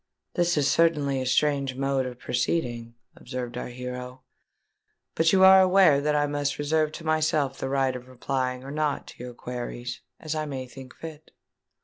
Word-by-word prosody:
"This 175 -2 +1
is 145 -2 +3
certainly 145 -5 +2
a 130 - -3
strange 140 0 +1
mode 135 -1 0
of 125 -1 -8
proceeding," 120 -2 -2 0.2
observed 125 -1 -6
our 125 - -4
hero; 125 +1 -7 0.9
"but 165 0 +3
you 190 -1 +5
are 190 0 +9
aware 185 -6 +5
that 150 +1 +1
I 145 0 +3
must 145 -1 -2
reserve 155 +1 +1
to 165 - -8
myself 155 -3 +1
the 135 - -3
right 135 -1 +1
of 125 0 -8
replying 130 0 -3
or 135 - -8
not 150 -1 -1
to - - -11
your 125 -1 -8
queries, 120 0 -6 0.2
as 155 -1 -4
I 155 -1 -2
may 135 -2 -5
think 130 0 -12
fit." 160 -1 -10
140 Hz, 175 wpm, -26 LUFS, 125-155 Hz, 0.9 s, are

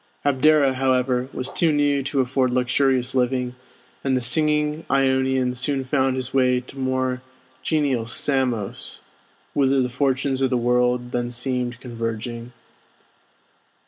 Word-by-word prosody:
Abdera, 145 0 +4
however, 130 -1 0
was 130 - -3
too 165 -2 +2
new 145 -1 +2
to 135 0 0
afford 130 0 +1
luxurious 125 +1 +1
living, 125 -1 0 0.5
and 130 -1 +1
the - - +1
singing 150 +4 +1
Ionian 130 -1 +2
soon 135 +2 -1
found 130 0 +1
his 130 -1 -2
way 125 -2 +3
to 130 +2 -12
more 130 -1 -1 0.4
genial 140 -7 0
Samos, 125 -5 -1 0.5
whither 135 -1 +2
the 125 -1 +1
fortunes 135 +1 0
of 135 - +2
the 125 - +1
world 125 0 +1
then 120 -1 -2
seemed 125 0 -2
converging. 115 -1 -5
130 Hz, 130 wpm, -22 LUFS, 125-135 Hz, 0.5 s, Abdera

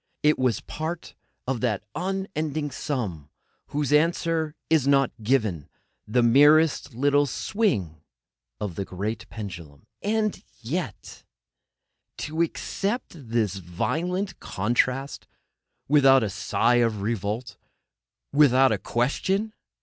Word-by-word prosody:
It 150 -1 +4
was 125 -4 +1
part 160 +2 -5 0.3
of 130 -3 -2
that 110 -6 0
unending 160 -5 -2
sum 100 - -4 0.4
whose 145 0 -1
answer 160 0 +2
is 155 -4 +3
not 135 -2 +4
given; 105 - 0 0.4
the 120 +3 +2
merest 145 +2 +5
little 145 +3 +3
swing 110 - -1 0.6
of 100 -4 -3
the 100 - -3
great 95 +1 -5
pendulum! 85 -9 -8 0.2
And 215 -1 0 0.2
yet——! 135 - -5 0.9
To 155 +2 -2
accept 200 +7 -2
this 115 - -1
violent 175 - -2
contrast 125 +6 -1 0.6
without 135 -3 +6
a 105 - -2
sigh 120 +4 +2
of 115 -4 +1
revolt, 110 +1 -3 0.8
without 135 -2 +5
a - - 0
question! 190 - 0
135 Hz, 105 wpm, -25 LUFS, 110-160 Hz, 0.9 s, without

